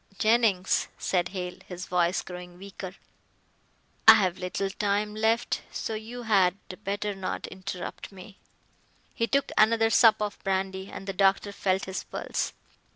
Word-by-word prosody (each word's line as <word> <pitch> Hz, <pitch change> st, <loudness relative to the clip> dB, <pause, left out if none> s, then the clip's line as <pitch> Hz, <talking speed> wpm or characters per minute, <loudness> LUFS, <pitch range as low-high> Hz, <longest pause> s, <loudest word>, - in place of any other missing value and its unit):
Jennings," 215 Hz, -4 st, +3 dB
said 175 Hz, -2 st, 0 dB
Hale, 180 Hz, -2 st, -5 dB
his 180 Hz, 0 st, -6 dB
voice 175 Hz, 0 st, +1 dB
growing 180 Hz, -1 st, -9 dB
weaker, 190 Hz, -1 st, -8 dB, 1.1 s
"I 225 Hz, -, +12 dB
have 185 Hz, -4 st, +1 dB
little 190 Hz, +2 st, -2 dB
time 205 Hz, +1 st, 0 dB
left, 220 Hz, +2 st, +1 dB
so 225 Hz, -, -4 dB
you 225 Hz, +3 st, -6 dB
had 195 Hz, -4 st, +3 dB, 0.3 s
better 205 Hz, +1 st, -2 dB
not 190 Hz, -1 st, -4 dB
interrupt 185 Hz, 0 st, -7 dB
me." 195 Hz, +1 st, -13 dB, 0.7 s
He 230 Hz, -, 0 dB
took 275 Hz, +5 st, +1 dB
another 225 Hz, +1 st, +4 dB
sup 225 Hz, 0 st, +6 dB
of 210 Hz, -1 st, -4 dB
brandy 190 Hz, 0 st, -2 dB
and -, -, -8 dB
the 195 Hz, -, -3 dB
doctor 195 Hz, +1 st, +2 dB
felt 190 Hz, -1 st, 0 dB
his 190 Hz, 0 st, -4 dB
pulse. -, -, -3 dB
195 Hz, 145 wpm, -27 LUFS, 185-215 Hz, 1.1 s, I